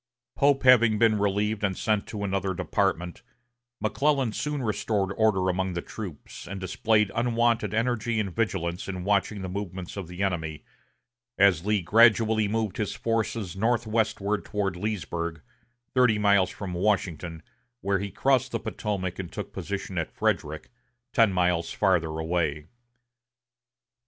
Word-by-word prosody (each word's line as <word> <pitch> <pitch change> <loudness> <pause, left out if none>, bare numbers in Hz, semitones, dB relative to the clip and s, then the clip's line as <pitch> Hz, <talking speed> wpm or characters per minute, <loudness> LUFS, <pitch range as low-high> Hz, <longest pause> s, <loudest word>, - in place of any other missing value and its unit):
Pope 140 -1 +3
having 120 -4 +6
been 110 -1 +3
relieved 105 +1 0
and 95 -3 0
sent 105 -2 0
to 105 -2 -5
another 95 -1 -1
department, 85 0 -1 0.6
McClellan 135 +3 +1
soon 145 +4 -3
restored 105 -3 -1
order 105 -4 +2
among 95 0 0
the 85 - -2
troops, 95 -9 -8
and 100 +2 -5
displayed 105 +2 +1
unwonted 115 -3 +1
energy 115 0 0
and 100 -5 -3
vigilance 90 -6 -1
in 95 -2 -4
watching 100 0 0
the - - -3
movements 95 -1 -5
of 95 -4 -5
the 90 +3 -4
enemy, 80 -5 -2 0.7
as 95 -2 +4
Lee 105 -3 +2
gradually 110 +2 +4
moved 110 -2 -1
his 105 -2 -2
forces 115 -4 -2
northwestward 110 -2 0
toward 100 -3 -2
Leesburg, 85 -5 -3 0.5
thirty 125 -4 +4
miles 100 -3 +4
from 95 -1 -6
Washington, 85 -4 -1 0.4
where 100 0 +1
he 100 +1 -3
crossed 130 +5 +1
the 115 - -1
Potomac 95 -5 -3
and 90 -3 -5
took - - -6
position - - -4
at - - -2
Frederick, 75 +5 -2 0.4
ten 115 -5 +5
miles 90 -2 +1
farther 85 -6 +1
away. 80 -2 -1
100 Hz, 140 wpm, -27 LUFS, 90-110 Hz, 0.7 s, having